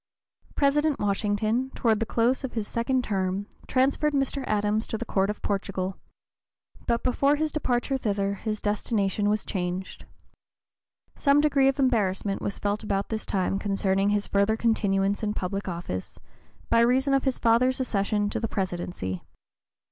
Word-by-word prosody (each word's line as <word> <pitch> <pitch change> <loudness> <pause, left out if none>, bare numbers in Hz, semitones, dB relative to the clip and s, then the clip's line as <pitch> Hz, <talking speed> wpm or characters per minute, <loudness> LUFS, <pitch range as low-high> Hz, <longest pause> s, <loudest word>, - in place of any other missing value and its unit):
President 295 +1 +2
Washington, 210 +5 0
toward 220 -3 +2
the 225 - -1
close 240 +4 +1
of 265 - -4
his 220 -3 -2
second 250 +2 0
term, 195 -2 -1 0.2
transferred 275 +3 +2
Mr. 275 0 0
Adams 210 +1 +1
to 220 - -3
the 240 - -5
Court 195 -2 +1
of 210 - -5
Portugal. 195 -2 -2 0.9
But 235 -1 +1
before 275 +3 +3
his 310 +1 -1
departure 265 -2 0
thither 200 -3 0
his 215 +1 -4
destination 205 -1 0
was 210 0 0
changed. 180 0 -4 1.1
Some 280 0 +4
degree 280 -2 +4
of 270 0 +2
embarrassment 205 -7 +1
was 200 - -3
felt 205 +1 -1
about 200 -1 -1
this 220 -1 -3
time 195 0 0
concerning 195 -1 +1
his 205 0 +1
further 200 +2 +2
continuance 200 -3 +1
in 210 -1 -1
public 195 +2 -3
office, 170 - -5 0.5
by 230 - +3
reason 260 +4 +3
of 275 0 +2
his 265 -2 +1
father's 245 +3 +3
accession 205 -4 0
to - - -2
the 225 - -1
Presidency. 175 - -3
215 Hz, 155 wpm, -26 LUFS, 195-255 Hz, 1.1 s, Some